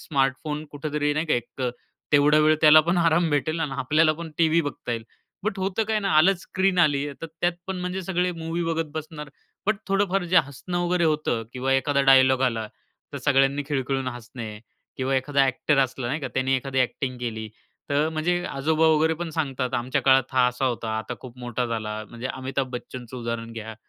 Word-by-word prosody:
Smartphone 150 Hz, +2 st, -1 dB
कुठेतरी 145 Hz, 0 st, -1 dB
नाही 155 Hz, +2 st, -1 dB
का -, -, +2 dB
एक 120 Hz, +2 st, -5 dB
अ, 125 Hz, -, +1 dB, 0.4 s
तेवढा 145 Hz, +1 st, +5 dB
वेळ 155 Hz, 0 st, +5 dB
त्याला 155 Hz, 0 st, +8 dB
पण 175 Hz, +1 st, +2 dB
आराम 165 Hz, 0 st, +3 dB
भेटेल 155 Hz, +3 st, 0 dB
आणि 150 Hz, -4 st, -2 dB
आपल्याला 155 Hz, +4 st, +3 dB
पण 165 Hz, 0 st, -7 dB
टीव्ही 165 Hz, 0 st, +4 dB
बघता 145 Hz, -5 st, -4 dB
येईल. 115 Hz, -1 st, -4 dB, 0.4 s
बट 200 Hz, -1 st, -2 dB
होतं 190 Hz, +3 st, 0 dB
काय 220 Hz, -1 st, +2 dB
ना, 195 Hz, -2 st, -1 dB
आलंच 180 Hz, +2 st, +4 dB
स्क्रीन 190 Hz, -1 st, 0 dB
आली, 145 Hz, -3 st, +3 dB
तर 165 Hz, -, -4 dB
त्यात 175 Hz, 0 st, +2 dB
पण 190 Hz, -1 st, -3 dB
म्हणजे 180 Hz, +1 st, -3 dB
सगळे 180 Hz, 0 st, 0 dB
मूव्ही 165 Hz, +1 st, -3 dB
बघत 165 Hz, -2 st, -1 dB
बसणार. 155 Hz, -1 st, -6 dB, 0.4 s
बट 215 Hz, -1 st, +2 dB
थोडंफार 195 Hz, -1 st, +1 dB
जे 180 Hz, +1 st, +1 dB
हसणं 175 Hz, +6 st, -5 dB
वगैरे 175 Hz, -1 st, +1 dB
होतं 150 Hz, -7 st, 0 dB
किंवा 130 Hz, +1 st, -1 dB
एखादा 140 Hz, +1 st, +2 dB
डायलॉग 130 Hz, -1 st, +6 dB
आला 115 Hz, -4 st, 0 dB, 0.5 s
तर -, -, -4 dB
सगळ्यांनी 140 Hz, 0 st, +2 dB
खिळखिळून 135 Hz, -2 st, -1 dB
हसणे 120 Hz, -3 st, -8 dB, 0.4 s
किंवा 135 Hz, +1 st, -1 dB
एखादा 140 Hz, +1 st, +2 dB
ॲक्टर 135 Hz, +2 st, +1 dB
असला 130 Hz, -1 st, -5 dB
नाही 145 Hz, +6 st, -2 dB
का, -, -, -3 dB
त्याने 130 Hz, 0 st, +2 dB
एखादी 135 Hz, 0 st, -3 dB
ॲक्टिंग 130 Hz, 0 st, -1 dB
केली, 110 Hz, -3 st, -4 dB, 0.4 s
तर 145 Hz, +2 st, +2 dB
म्हणजे 175 Hz, +3 st, 0 dB
आजोबा 155 Hz, +3 st, +1 dB
वगैरे 160 Hz, +1 st, +3 dB
पण 170 Hz, 0 st, -5 dB
सांगतात, 135 Hz, -5 st, -2 dB
"आमच्या 125 Hz, +2 st, 0 dB
काळात 135 Hz, 0 st, +5 dB
हा 130 Hz, -1 st, +4 dB
असा 125 Hz, +2 st, -3 dB
होता, 115 Hz, -2 st, -2 dB
आता 110 Hz, +3 st, -5 dB
खूप 125 Hz, -1 st, -11 dB
मोठा 120 Hz, 0 st, -2 dB
झाला." 110 Hz, -1 st, -4 dB
म्हणजे 120 Hz, +2 st, -5 dB
अमिताभ 130 Hz, 0 st, -3 dB
बच्चनचं 125 Hz, 0 st, -7 dB
उदाहरण 115 Hz, -1 st, -4 dB
घ्या 110 Hz, -1 st, -7 dB
145 Hz, 195 wpm, -25 LUFS, 130-165 Hz, 0.5 s, त्याला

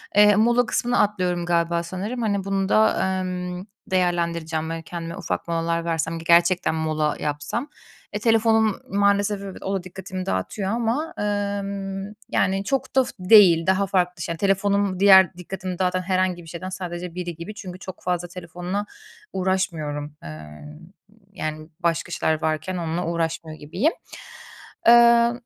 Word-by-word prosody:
Eee 210 Hz, 0 st, +7 dB
mola 240 Hz, +3 st, +3 dB
kısmını 245 Hz, +2 st, 0 dB
atlıyorum 180 Hz, -4 st, +1 dB
galiba 170 Hz, 0 st, +1 dB
sanırım. 200 Hz, +8 st, -4 dB
Hani 200 Hz, -3 st, 0 dB
bunu 195 Hz, 0 st, -1 dB
da, 215 Hz, +1 st, +4 dB, 0.2 s
emm, 180 Hz, 0 st, -4 dB, 0.3 s
değerlendireceğim 170 Hz, -3 st, 0 dB
ve 165 Hz, 0 st, -4 dB
kendime 170 Hz, +1 st, -6 dB
ufak 185 Hz, -3 st, -3 dB
molalar 170 Hz, 0 st, -1 dB
versem 165 Hz, 0 st, -1 dB
ki -, -, -9 dB
gerçekten 170 Hz, 0 st, +4 dB
mola 155 Hz, -1 st, 0 dB
yapsam, 150 Hz, -, -3 dB, 0.5 s
eee, 210 Hz, -, -2 dB
telefonum 225 Hz, -1 st, +3 dB
maalesef 200 Hz, 0 st, +2 dB, 0.2 s
o 195 Hz, -, -3 dB
da 190 Hz, -, -3 dB
dikkatimi 185 Hz, 0 st, -7 dB
dağıtıyor 140 Hz, -, -2 dB
ama, 240 Hz, +8 st, -1 dB
emm, 200 Hz, -1 st, -2 dB, 0.3 s
yani 195 Hz, +1 st, +1 dB
çok 270 Hz, +5 st, -2 dB
da 265 Hz, -, +6 dB
f -, -, -7 dB
değil. 180 Hz, -4 st, +6 dB
Daha 190 Hz, +1 st, +2 dB
farklı 180 Hz, -2 st, 0 dB
şey 170 Hz, -1 st, -3 dB
telefonum 200 Hz, 0 st, +1 dB
diğer 190 Hz, -3 st, +7 dB
dikkatimi 185 Hz, 0 st, -6 dB
dağıtan 185 Hz, 0 st, +1 dB
herhangi 185 Hz, -1 st, 0 dB
bir -, -, -15 dB
şeyden 170 Hz, +3 st, -6 dB
sadece 180 Hz, -2 st, -6 dB
biri 175 Hz, -2 st, -4 dB
gibi 170 Hz, +6 st, -7 dB
çünkü 185 Hz, -3 st, -8 dB
çok 185 Hz, 0 st, -9 dB
fazla 180 Hz, -1 st, -1 dB
telefonla 180 Hz, +3 st, -5 dB, 0.5 s
uğraşmıyorum. 165 Hz, -6 st, -2 dB
Eee, 75 Hz, 0 st, -8 dB, 0.9 s
yani 155 Hz, 0 st, -5 dB
başka 170 Hz, -1 st, 0 dB
işler 160 Hz, -2 st, 0 dB
varken 160 Hz, +3 st, -1 dB
onunla 170 Hz, +1 st, -2 dB
uğraşmıyor 165 Hz, -1 st, -3 dB
gibiyim. 180 Hz, -, 0 dB, 0.9 s
Eee, 235 Hz, 0 st, +7 dB
185 Hz, 145 wpm, -23 LUFS, 170-200 Hz, 0.9 s, Eee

